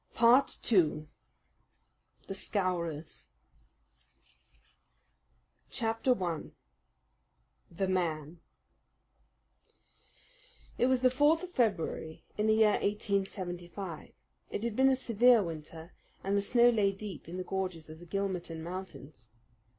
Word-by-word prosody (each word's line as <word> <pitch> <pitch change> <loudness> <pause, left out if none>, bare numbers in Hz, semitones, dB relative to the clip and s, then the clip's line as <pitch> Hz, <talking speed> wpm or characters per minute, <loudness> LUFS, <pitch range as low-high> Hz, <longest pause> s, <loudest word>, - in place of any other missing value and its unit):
Part 240 +4 +5
2 155 -7 +2 1.2
The - - -5
Scowrers 170 - -3 2.4
Chapter 225 +3 +1
1 175 -6 -4 1.2
The 185 +3 -2
Man 165 -3 -2 2.4
It 245 - +4
was 260 -1 +2
the 255 -1 +4
fourth 295 +6 +3
of 365 - -7
February 195 - -1
in 210 +1 0
the 220 - +4
year 220 -1 +4
1875. 190 -4 -3 0.4
It 205 - -4
had 235 -2 -2
been 265 +2 +5
a 265 - +4
severe 240 -2 +4
winter, 160 0 -8 0.3
and 195 +1 0
the 200 - +3
snow 240 +4 +5
lay 205 -4 +2
deep 195 -5 -8
in 180 - -6
the 185 - -3
gorges 180 -5 -4
of 160 - -11
the 175 - -13
Gilmerton 180 -4 -3
Mountains. 170 - -8
195 Hz, 110 wpm, -31 LUFS, 170-225 Hz, 2.4 s, Part